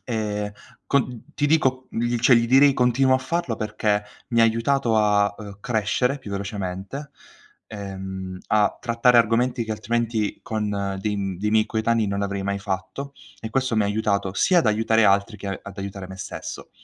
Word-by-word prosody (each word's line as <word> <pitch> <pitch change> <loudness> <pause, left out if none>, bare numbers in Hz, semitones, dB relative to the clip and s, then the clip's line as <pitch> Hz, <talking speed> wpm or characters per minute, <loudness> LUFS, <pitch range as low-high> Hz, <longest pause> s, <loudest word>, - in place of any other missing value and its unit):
Ehm, 105 -2 -2 0.3
con 125 -4 0
ti 145 - +2
dico 130 -4 +2
gli 120 +1 -1
cioè, 125 +2 +5
gli 115 - +2
direi: 135 +2 +6
"Continuo 130 +1 +3
a 130 - +3
farlo," 135 -2 -2
perché 105 -1 0 0.3
mi 115 -2 +2
ha - - +7
aiutato 115 +1 +1
a, 105 -1 +3
uhm, 100 -2 -9
crescere 125 +4 0
più 105 -6 -10
velocemente, 100 +7 -5 0.6
ehm, 95 -2 -6
a 105 -1 +2
trattare 120 0 +4
argomenti 120 +2 +2
che 110 - -7
altrimenti 110 -1 -1
con 100 -3 -2
dei 105 +1 -1
m 95 -2 -3
dei 105 +2 -1
miei 110 0 +4
coetanei 110 0 +1
non 100 0 -1
avrei 100 -1 -2
mai 100 0 -1
fatto 95 +8 -5 0.3
e 110 - -6
questo 130 -1 0
mi 110 - +4
ha - - +1
aiutato 100 -2 0
sia 180 - +4
ad 165 - +2
aiutare 110 +1 +3
altri 100 +2 +2
che 100 - -8
a 95 - -4
ad 100 -1 -10
aiutare 100 -1 -6
me 95 - -9
stesso. 95 0 -7
110 Hz, 180 wpm, -23 LUFS, 100-120 Hz, 0.6 s, ha